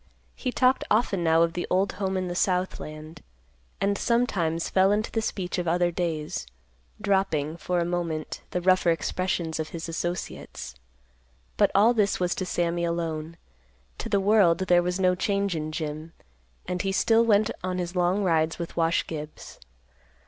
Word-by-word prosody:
He 255 - -3
talked 255 +1 +3
often 210 -4 +2
now 165 0 +4
of 165 0 0
the 175 - -3
old 190 +2 +2
home 190 -1 -2
in 185 -1 -2
the 175 - -3
south 180 0 0
land, 155 +1 -9 0.6
and 200 +1 +1
sometimes 175 -9 +1
fell 190 +1 +3
into 215 +2 0
the 225 - 0
speech 185 -5 -3
of 175 - -3
other 175 +1 +2
days, 160 - -3 0.5
dropping, 190 -7 0
for 180 +1 -2
a 170 - +1
moment, 170 -3 -3
the 180 - -2
rougher 185 -1 +3
expressions 170 -1 -1
of 155 - -3
his 165 -1 -6
associates. 175 - -5 0.8
But - - +4
all 215 +5 +6
this 210 -4 +1
was 180 -1 +1
to 185 - -4
Sammy 170 -1 0
alone. 165 -1 -3 0.6
To - - -4
the 200 - +2
world, 195 -4 +4
there 175 -1 +4
was 180 +2 -2
no 185 -1 +4
change 200 0 0
in 155 0 -3
Jim, 155 +1 -5 0.5
and 180 -1 -2
he 195 - -1
still 225 +3 +4
went 215 -1 +3
on 185 0 -2
his 175 0 -4
long 180 +3 +2
rides 165 -3 +1
with 170 -1 -6
Wash 165 0 +1
Gibbs. 155 -1 -8
175 Hz, 170 wpm, -26 LUFS, 165-195 Hz, 0.8 s, all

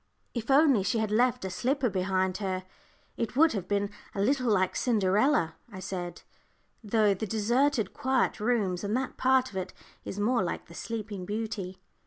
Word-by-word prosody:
"If 235 0 -4
only 275 -5 +5
she 200 +4 0
had 220 -1 0
left 240 -1 +2
a 190 - -3
slipper 260 +6 0
behind 190 -2 0
her, 185 -2 -2 0.5
it 230 - -3
would 320 +3 +5
have 190 -4 -3
been 200 0 0 0.2
a - - -3
little 250 +1 +2
like 185 -2 +2
Cinderella," 210 - +2
I 190 - -8
said; 175 -2 -5 0.6
"though 210 -1 +3
the 205 +3 -4
deserted, 235 +4 +1
quiet 265 -4 +1
rooms, 210 -5 0
and 205 +4 0
that 260 0 -3
part 260 0 +3
of 190 - -6
it, 185 0 -4 0.3
is 195 - -6
more 235 +3 +2
like 175 - -3
the 170 - -14
Sleeping 210 -1 -5
Beauty." 205 -4 -4
210 Hz, 175 wpm, -29 LUFS, 190-245 Hz, 0.6 s, only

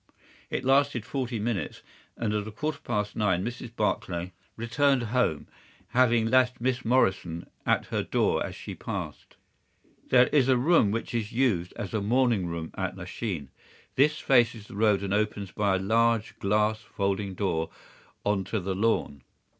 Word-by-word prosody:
It 130 - -3
lasted 135 -3 +3
forty 125 -1 -3
minutes, 110 -2 -3 0.3
and 105 -2 -1
at 105 0 -1
a - - -6
quarter 150 +5 -3
past 105 -4 -2
nine 95 -3 +1
Mrs. 120 0 -6
Barclay 90 -4 -1 0.2
returned 125 +3 +2
home, 125 -12 +1 0.4
having 120 -2 +3
left 125 +2 +3
Miss 125 +1 0
Morrison 95 -8 +1 0.2
at - - +2
her - - +1
door - - +1
as - - -6
she - - -7
passed. - - -6 0.7
"There 125 -1 +6
is 135 -3 +3
a 130 - +5
room 135 -4 +4
which 115 +3 -3
is 115 -2 -2
used 110 -9 +1
as 100 - -5
a 110 - 0
morning 115 -3 +2
room 85 -1 -5
at 95 -1 -3
Lachine. 90 - -5 0.4
This 150 +3 +3
faces 120 -6 +2
the 110 - -11
road 105 -2 +3
and 100 0 -2
opens 105 -2 -1
by 100 -2 +1
a - - 0
large 115 +2 +1
glass 105 +2 +1
folding 100 -2 -2
door 80 -5 -1 0.6
on 105 -2 +1
to 110 +4 -2
the 95 +1 -2
lawn. 95 - 0
110 Hz, 160 wpm, -27 LUFS, 100-125 Hz, 0.7 s, There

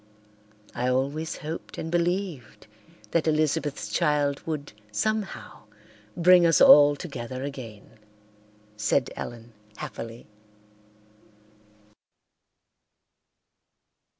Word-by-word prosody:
"I 125 - -2
always 140 +5 -1
hoped 155 +2 -7
and 160 - -5
believed 175 - -2 0.5
that 165 -1 +1
Elizabeth's 150 -7 0
child 145 -3 +1
would 150 -5 -4 0.2
somehow 215 - -3 0.5
bring 180 +1 +6
us 165 -2 +4
all 145 0 +8
together 130 -5 -6
again," 115 -6 -9 0.8
said 110 +5 0
Ellen 120 -1 -8 0.2
happily. 115 +2 -8
145 Hz, 75 wpm, -26 LUFS, 120-165 Hz, 0.8 s, all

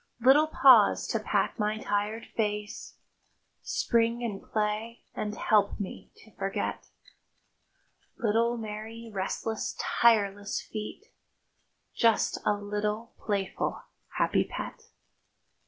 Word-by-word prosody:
Little 270 +6 +6
paws 260 -7 +6
to - - 0
pat - - 0
my 210 0 0
tired 210 +1 -2
face, 210 -1 -3 0.6
Spring 235 0 +1
and 210 -4 -3
play, 215 +2 -2
and 210 0 -3
help 205 -2 +2
me 200 - -6 0.2
to 220 - -20
forget. 195 0 -3 1.3
Little, 230 +2 +1
merry, 225 +1 -7
restless, 205 +3 -3
tireless 205 -3 +2
feet— 215 - -7 0.9
Just 230 -2 +3
a - - +5
little 210 +2 -3
playful, 200 -3 -2 0.3
happy - - +3
pet. - - -7
215 Hz, 100 wpm, -29 LUFS, 205-230 Hz, 1.3 s, Little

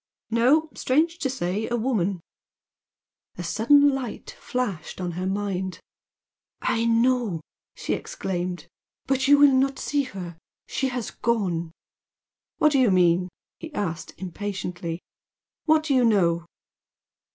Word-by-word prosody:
"No. 280 +7 +3
Strange 325 +6 +1
to 280 -5 0
say, 215 -4 -2
a 240 - 0
woman." 205 -7 0 1.2
A 175 - -4
sudden 285 +11 +5
light 260 -4 -5
flashed 245 -11 -4
on 180 -1 -2
her 180 +2 -3
mind. 190 -1 -2 0.8
"I 230 0 0
know!" 230 -6 +2 0.3
she - - -2
exclaimed 180 -1 -4 0.4
"But 265 -1 +1
you 285 +1 +7
will 285 -1 +7
not 270 +1 +2
see 290 -1 0
her! 180 -7 -8 0.3
She 265 - -1
has 245 -3 -3
gone!" 180 -8 -1 0.9
"What 305 - +4
do 275 - +3
you 250 -4 +5
mean?" 180 -1 +3 0.3
he 325 - -8
asked, 170 -5 -3
impatiently 180 -3 -5 0.6
"What 315 -1 +4
do 300 -3 0
you 255 -2 +4
know?" 170 -7 +2
220 Hz, 130 wpm, -25 LUFS, 180-265 Hz, 1.2 s, you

